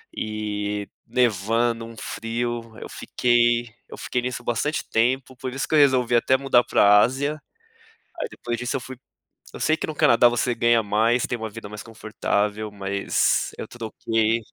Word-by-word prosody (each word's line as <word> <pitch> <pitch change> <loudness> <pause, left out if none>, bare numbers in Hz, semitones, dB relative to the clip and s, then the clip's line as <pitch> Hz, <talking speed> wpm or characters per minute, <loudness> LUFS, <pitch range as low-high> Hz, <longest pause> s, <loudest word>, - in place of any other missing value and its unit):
e 105 -1 -3 0.2
nevando, 115 0 +1
um 115 0 -11
frio. 115 0 -4
Eu - - -8
fiquei 120 -1 +1 0.2
eu - - -10
fiquei 125 - -2
nisso, 125 0 -4
bastante 120 +6 -1
tempo, 130 +3 0
por 130 0 -5
isso 135 - -3
que - - 0
eu - - +6
resolvi 130 -4 +4
até 125 +2 +3
mudar 130 -2 +3
pra 105 0 +5
Ásia. 140 +6 0 0.8
Aí - - -2
depois 120 - -5
disso, 125 +1 -3
eu - - 0
fui 130 +1 -8 0.6
Eu - - -8
sei 155 - +2
que - - -3
no 155 - -5
Canadá 120 -3 +5
você 120 0 0
ganha 115 0 +3
mais, 110 +3 +1
tem 120 - -2
uma 110 -1 -5
vida 115 0 -9
mais 105 0 -8
confortável, 105 -1 -2
mas 100 -1 0
eu - - -6
troquei, 115 -1 -1
115 Hz, 170 wpm, -23 LUFS, 110-125 Hz, 0.8 s, eu